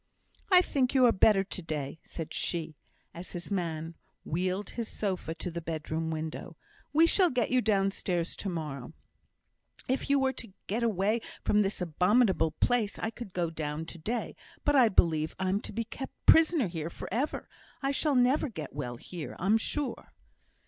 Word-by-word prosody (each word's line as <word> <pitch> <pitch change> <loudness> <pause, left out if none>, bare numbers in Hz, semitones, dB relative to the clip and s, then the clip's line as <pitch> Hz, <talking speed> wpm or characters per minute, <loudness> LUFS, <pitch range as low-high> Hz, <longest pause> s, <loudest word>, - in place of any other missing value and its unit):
"I 365 -1 +9
think 270 -5 0
you 260 -1 +6
are 240 - +7
better 195 -1 +5
to 190 -1 -6
day," 155 -2 -4
said 160 -1 -7
she, 165 -3 -2 0.4
as 175 +2 -8
his 175 +2 -6
man 165 -4 -2 0.3
wheeled 185 +5 -1
his 235 -2 -4
sofa 185 -7 -3
to 180 - -5
the 170 +1 -4
bedroom 160 0 -3
window. 160 +1 -5 0.3
"We 315 +3 +6
shall 360 +1 +4
get 250 -4 0
you 255 0 +4
downstairs 195 -5 0
to 200 - -3
morrow." 150 -5 -5 0.9
"If 260 +2 -1
it 280 - +5
were 265 -1 +2
to 225 -7 -9
get 220 +5 -1
away 215 0 +1 0.2
from 210 - +3
this 195 -1 -1
abominable 180 +1 +3
place, 220 +6 0
I 225 - -2
could 230 -3 -8
go 175 -2 -1
down 155 0 -3
to 170 - -10
day; 230 +9 -3 0.3
but 290 - +3
I 250 -4 +6
believe 160 -5 +2
I'm 190 +2 0
to - - -6
be 230 - -2
kept 265 +4 -7
prisoner 320 -4 +6
here 165 -2 -4
for - - -8
ever. 260 +9 -1 0.4
I 275 - +2
shall 285 +1 +1
never 260 +4 +3
get 160 - -7
well 125 -4 -4
here, 170 +4 -7
I'm 195 +5 +3
sure." 290 +4 -3
190 Hz, 175 wpm, -30 LUFS, 165-240 Hz, 0.9 s, I